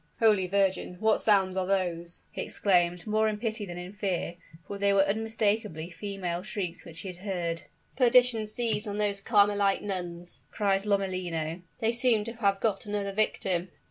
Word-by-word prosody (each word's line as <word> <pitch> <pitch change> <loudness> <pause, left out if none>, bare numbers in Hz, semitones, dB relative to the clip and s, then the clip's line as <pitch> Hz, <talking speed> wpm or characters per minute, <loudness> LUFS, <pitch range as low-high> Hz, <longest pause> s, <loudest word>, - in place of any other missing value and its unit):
"Holy 210 -5 +4
Virgin! 190 -1 +1
what 220 0 +3
sounds 195 -3 +3
are 185 -1 -1
those?" 175 -3 -1
he - - -5
exclaimed, 175 -3 +1
more 215 0 +2
in 215 -1 -1
pity 220 -1 -3
than 175 0 -7
in 180 +2 -7
fear 190 -4 -2 0.3
for 200 +4 -6
they 200 0 +3
were 195 0 +5
unmistakably 210 -4 -1
female 185 -3 -4
shrieks 185 -4 -4
which 165 -1 -8
he 190 -2 -6
heard. 175 -3 -3 0.3
"Perdition 245 -3 +4
seize 220 -1 -1
on 205 0 -3
those 205 -1 0
Carmelite 205 -2 +3
nuns!" 175 -3 -5
cried 200 -1 0
Lomellino; 180 -4 -1 0.2
"they 225 0 +3
seem 235 -2 +3
to 230 +2 -5
have 200 -3 +2
got 210 -1 -1
another 205 -1 -2
victim!" 190 -3 0
200 Hz, 165 wpm, -28 LUFS, 180-215 Hz, 0.3 s, were